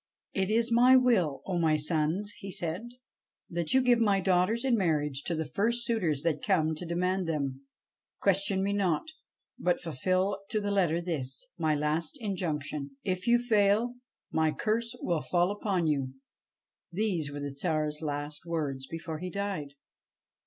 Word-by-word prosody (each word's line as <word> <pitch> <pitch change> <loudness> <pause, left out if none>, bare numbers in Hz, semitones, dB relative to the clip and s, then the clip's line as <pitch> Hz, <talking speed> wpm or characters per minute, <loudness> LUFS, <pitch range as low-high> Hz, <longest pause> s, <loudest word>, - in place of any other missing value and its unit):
' - - -57
It 190 - 0
is 230 +2 +2
my 245 +3 +7
will, 225 - +3
O 180 -3 -1
my 160 -2 +3
sons,' 160 +6 0
he 195 - -7
said, 180 +7 -2 0.3
' - - -61
that 170 +4 0
you 265 - +5
give 245 -2 +4
my 205 -4 +3
daughters 190 +6 +2
in 255 -3 +4
marriage 150 -8 +1
to 170 - -1
the 160 0 -2
first 235 +9 +1
suitors 170 - 0
that 160 -3 0
come 160 -6 +2
to 165 +3 -5
demand 180 +2 0
them. 140 -4 -2 0.6
Question 195 0 +2
me 200 +1 0
not, 190 - 0 0.5
but 180 0 +1
fulfil 185 +5 0
to 220 - 0
the 205 -1 -2
letter 175 -4 +2
this, 135 -7 -2
my 155 -2 +2
last 150 - -1
injunction. 150 - -3
If 185 +1 -2
you 240 0 +6
fail, 225 0 +2 0.4
my 160 -1 +2
curse 230 +5 -1
will 170 -3 0
fall 175 +1 +1
upon 200 -4 -1
you.' 135 -4 0 0.8
These 175 -6 -1
were 145 - -5
the 145 0 -3
Tsar's 150 0 -1
last 145 -1 -4
words 150 -6 -3
before 160 -1 -5
he 180 +2 -4
died. 185 -8 -4
175 Hz, 165 wpm, -29 LUFS, 155-205 Hz, 0.8 s, my